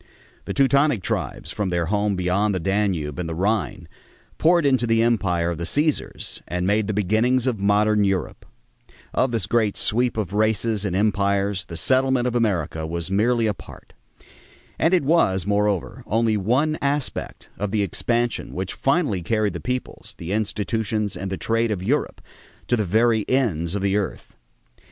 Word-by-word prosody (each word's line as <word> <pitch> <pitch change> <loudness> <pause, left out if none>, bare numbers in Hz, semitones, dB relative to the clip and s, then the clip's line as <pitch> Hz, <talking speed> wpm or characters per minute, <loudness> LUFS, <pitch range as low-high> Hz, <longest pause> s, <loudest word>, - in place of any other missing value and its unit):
The - - -3
Teutonic 140 -5 +3
tribes, - - -3
from 105 -3 -2
their 85 -1 0
home 105 +2 0
beyond 95 +3 +1
the - - -1
Danube 95 -5 -1
and 85 -2 -3
the 80 - -4
Rhine, 100 -1 -1 0.5
poured 170 -1 +4
into 130 -4 +2
the 115 0 +3
empire 90 -7 +1
of 85 - -5
the - - -3
Cæsars 150 - -1
and 90 0 -2
made 105 +2 +1
the - - 0
beginnings 110 +5 +1
of 125 -5 0
modern 105 +1 +3
Europe. 95 -2 -2 0.7
Of 130 - +1
this 115 -5 -1
great 110 -1 +1
sweep 120 +2 0
of 100 -4 -2
races 110 0 +1
and 95 -3 -1
empires 100 -1 +1
the 85 - -8
settlement 130 +1 +2
of 125 -1 -1
America 85 -9 0
was 85 +2 -4
merely 115 +4 +2
a 105 - +1
part. 90 - -14 0.9
And 165 - +3
it 175 - +1
was, 115 - +2
moreover, 100 -7 0
only 110 +1 +2
one 130 +10 +1
aspect 140 -1 -2
of 105 - -1
the 105 0 +1
expansion 120 +5 -1
which 95 0 -3
finally 135 - 0
carried 105 +1 0
the 85 - -5
peoples, 125 0 -5
the 85 +2 -6
institutions, 105 0 -1
and 95 +2 -5
the 95 - -3
trade 115 +3 0
of 100 -4 -2
Europe 140 +9 -1 0.5
to 120 - +4
the 110 -3 0
very 110 +3 +2
ends 100 - 0
of 100 - -2
the 100 +1 +2
earth. 105 - -4
105 Hz, 170 wpm, -23 LUFS, 95-120 Hz, 0.9 s, poured